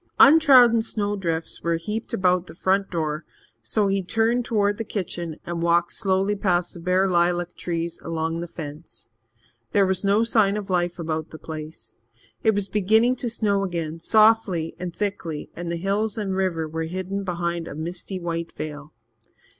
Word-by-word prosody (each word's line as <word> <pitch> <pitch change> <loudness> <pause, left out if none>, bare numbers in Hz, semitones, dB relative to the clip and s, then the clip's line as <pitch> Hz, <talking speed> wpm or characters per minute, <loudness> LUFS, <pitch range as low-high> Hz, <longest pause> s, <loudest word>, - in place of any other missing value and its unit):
Untrodden 270 -6 +7
snowdrifts 205 -7 -2
were 170 0 +1
heaped 210 +7 -4
about 180 -1 +2
the - - -11
front 195 +2 +1
door, 155 -2 -2 0.4
so 215 -2 +1
he 195 0 +1
turned 225 +6 +1
towards 205 -3 +1
the - - -1
kitchen 175 -6 -4
and 170 -1 -3
walked 170 0 +2
slowly 195 0 +1
past 180 -3 0
the 175 - -9
bare 180 +3 +2
lilac 175 -1 +1
trees 170 -1 -3
along 165 0 -2
the 170 - -4
fence. 155 -5 -9 0.6
There 200 -1 +5
was 190 0 0
no 200 +3 +3
sign 215 -3 +3
of 200 -2 -5
life 175 -1 0
about 160 -2 -3
the 160 - -10
place. 155 0 -8 0.5
It 220 -2 +3
was 200 -1 -1
beginning 220 +5 +3
to 240 - -2
snow 210 -3 0
again, 165 -3 -3
softly 215 -5 +3
and 180 0 -4
thickly, 170 -6 -4
and 170 0 -4
the - - -1
hills 200 +5 -1
and 195 -3 -2
river 175 -4 0
were 160 +1 -3
hidden 185 +3 -4
behind 170 -2 -2
a - - -7
misty 175 +4 -5
white 170 -1 -3
veil. 150 0 -7
180 Hz, 170 wpm, -24 LUFS, 165-205 Hz, 0.6 s, Untrodden